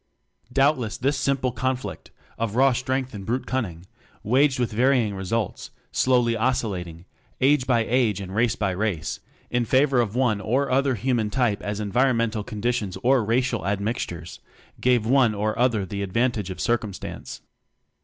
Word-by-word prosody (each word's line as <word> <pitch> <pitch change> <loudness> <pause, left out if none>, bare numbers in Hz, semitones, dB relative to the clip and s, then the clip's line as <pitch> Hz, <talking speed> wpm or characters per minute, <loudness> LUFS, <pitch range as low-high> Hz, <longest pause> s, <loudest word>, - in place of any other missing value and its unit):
Doubtless 135 -4 +2
this 140 +3 +1
simple 135 -2 0
conflict 130 +2 -3 0.3
(of 115 -2 -2
raw 135 +1 +5
strength 130 +1 -2
and 100 -2 -7
brute 120 +6 -2
cunning) 95 -10 -3 0.4
waged 130 +5 +3
with 125 -2 -1
varying 120 -1 +2
results, 100 +2 -3 0.2
slowly 120 -2 +2
oscillating, 95 -8 -2 0.3
age 135 0 +3
by 120 -3 +2
age 115 -5 +2
and 95 -1 -7
race 115 +2 +2
by 100 -2 -1
race, 90 -5 -2 0.3
in 120 0 +1
favor 130 +2 +3
of 110 -2 -3
one 120 -6 +1
or 130 +8 0
other 135 0 +2
human 120 -1 0
type 120 -4 0
as 105 0 -3
environmental 115 0 +1
conditions 105 -2 -2
or 130 -1 +4
racial 120 -1 0
admixtures 100 -5 -3 0.4
gave 125 -3 +2
one 125 -3 +3
or 105 +1 -1
other 120 -5 +2
the 100 +2 -5
advantage 105 +1 0
of 95 - -6
circumstance. 110 -5 -3
115 Hz, 150 wpm, -24 LUFS, 105-130 Hz, 0.4 s, raw